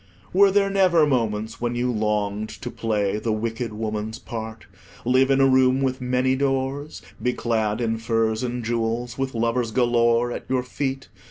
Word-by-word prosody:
Were 200 +2 +6
there 195 0 +2
never 185 -5 +4
moments 110 -6 -1
when 120 0 -1
you 125 +1 0
longed 105 -1 -1
to 120 - -4
play 105 -2 -1
the 115 - -1
wicked 115 +1 -2
woman's 110 0 -4
part, 110 -1 -7 0.4
live 130 +2 +3
in 135 0 +3
a 135 - +6
room 130 0 +4
with 130 -1 -1
many 125 +1 +1
doors, 135 +2 -2 0.2
be 125 - +1
clad 110 -3 -1
in 115 -1 -1
furs 115 -1 0
and 125 -1 -3
jewels, 115 +2 -2
with 135 -2 -2
lovers 115 +1 0
galore 120 0 +2
at - - -6
your 130 -1 +1
feet? 135 +1 -4
120 Hz, 170 wpm, -23 LUFS, 110-130 Hz, 0.4 s, Were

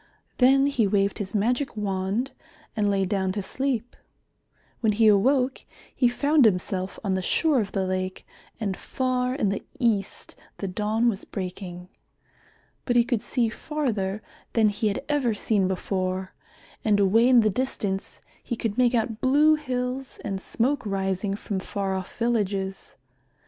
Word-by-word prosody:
Then 270 +2 +6
he 250 -7 +2
waved 200 0 +1
his 205 0 -4
magic 240 +4 0
wand 200 +5 -1 0.4
and 210 -2 +1
lay 195 -1 +1
down 190 -1 0
to 205 -1 -3
sleep. 250 +1 -2 0.8
When 220 -3 +2
he 225 +2 +3
awoke, 255 +6 +3 0.3
he 250 - +4
found 285 +4 +3
himself 185 -2 +1
on 195 -3 0
the 190 - 0
shore 290 - +2
of 200 -2 -5
the 190 -1 0
lake, 185 0 -3 0.3
and 200 -4 -1
far 255 +2 -1
in 210 -8 +1
the 195 - -3
east 215 -6 -1 0.2
the 195 - -4
dawn 215 +5 0
was 215 -4 0
breaking. 180 -2 -6 1.0
But 245 - 0
he 240 - +6
could 240 -3 -1
see 240 0 0
farther 220 -8 -2 0.3
than 220 -2 +4
he 210 +2 -1
had 210 +7 -2
ever 275 -7 +1
seen 205 -2 +2
before, 185 0 -2 0.5
and 210 -2 +3
away 220 +5 +4
in 250 -2 +7
the 215 -1 +2
distance 200 -4 -3 0.2
he 240 - -3
could 225 0 -2
make 250 0 +4
out 225 -1 -1
blue 295 +4 +5
hills 255 -3 -3
and 195 -3 -3
smoke 255 +6 0
rising 195 -1 -1
from 200 -1 -4
far 195 0 -3
off 190 -1 -5
villages. 200 -5 -1
215 Hz, 155 wpm, -25 LUFS, 195-250 Hz, 1.0 s, in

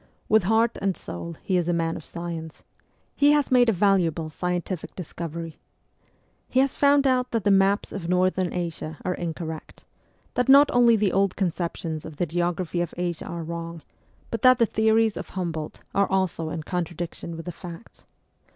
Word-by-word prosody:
With 215 -4 +4
heart 225 +3 +2
and 195 -2 0
soul 170 0 -7
he 185 - +1
is 175 -1 0
a - - +2
man 165 -1 0
of 160 - -7
science; 165 -2 -7 0.5
he 290 +1 +5
has 295 -2 +1
made 245 -2 +5
a - - +5
valuable 175 -5 +2
scientific 180 +1 -3
discovery. 165 -2 -6 0.9
He 255 - +2
has 270 0 +3
found 285 0 +4
out 255 -1 +2
that 230 -3 -1
the 205 - +3
maps 195 +1 +3
of 175 -4 -5
Northern 185 0 +2
Asia 165 -3 -4
are 180 - +1
incorrect; 160 -2 -6 0.5
that 250 +1 0
not 280 +2 +8
only 240 -1 +6
the 205 -3 +1
old 195 0 +2
conceptions 170 -3 -2
of 155 - -9
the 175 - +1
geography 175 +1 -1
of 175 - -4
Asia 175 -2 -3
are 170 -1 -5
wrong, 170 0 -6 0.5
but 230 - -3
that 255 -1 +7
the 235 - +4
theories 220 0 +2
of - - -6
Humboldt 165 -5 -4
are 200 -1 +2
also 185 -4 0
in 160 -1 -4
contradiction 170 -1 -4
with 165 - -8
the 175 - -4
facts. 175 +3 -11
180 Hz, 180 wpm, -25 LUFS, 165-215 Hz, 0.9 s, not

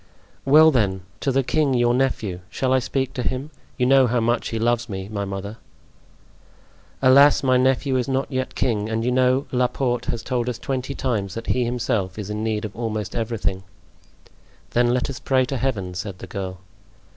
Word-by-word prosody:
"Well, 155 +3 +7
then, 100 -8 +1 0.2
to 135 - 0
the 135 +1 +2
king, 140 0 +1
your 120 0 +3
nephew. 115 -8 -1
Shall 130 -1 0
I 130 - +4
speak 130 +1 -2
to 125 - -3
him? 130 +5 -3 0.3
You 125 - +2
know 135 0 +5
how 120 +1 +1
much 115 +1 0
he 115 - -3
loves 120 +1 0
me, 95 -1 -5
my 100 -1 -3
mother. 100 +2 -6 1.5
"Alas! 140 +2 +6
my 130 -1 +3
nephew 130 +1 +2
is 125 - -1
not 135 +1 -1
yet 130 0 -3
king, 110 -4 0
and 115 +1 -1
you 125 - +1
know 130 +2 +2
Laporte 125 0 0
has 115 -1 -3
told 125 -1 -1
us 120 - -4
twenty 130 +2 -3
times 105 -9 -2
that 115 - -5
he 125 -1 0
himself 115 -6 -1
is 105 -1 -5
in 105 +1 -3
need 110 -1 -1
of 105 - -7
almost 110 -3 -3
everything." 115 -5 -2 1.1
"Then 120 0 +3
let 125 0 0
us 140 -2 -6
pray 130 -1 +2
to 135 +1 -3
Heaven," 105 -9 -2
said 90 +1 -5
the - - -9
girl. 95 0 -5
120 Hz, 190 wpm, -23 LUFS, 110-130 Hz, 1.5 s, Well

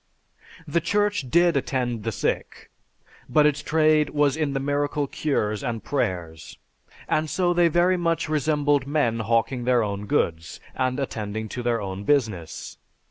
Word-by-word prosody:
The 165 +3 +1
Church 205 -5 0
did 170 +3 +4
attend 125 -4 -1
the 115 +2 -2
sick, - - -3 0.6
but 150 +4 +4
its 150 -1 +2
trade 155 -1 +3
was 145 -2 +2
in 155 -3 -1
the 135 - -1
miracle 145 +1 -1
cures 110 -8 -1
and 115 -5 -3
prayers, 90 - -3 0.5
and 155 0 0
so 175 0 +1
they 175 0 +4
very 175 +3 +3
much 165 -1 0
resembled 145 -2 +1
men 140 -6 +1
hawking 115 +3 0
their 125 -2 +3
own 100 0 -4
goods, 80 -4 -1
and 130 +1 -1
attending 110 -4 -4
to 125 - -5
their 120 -1 0
own 95 -1 -5
business. 105 - -1
135 Hz, 150 wpm, -24 LUFS, 110-155 Hz, 0.6 s, did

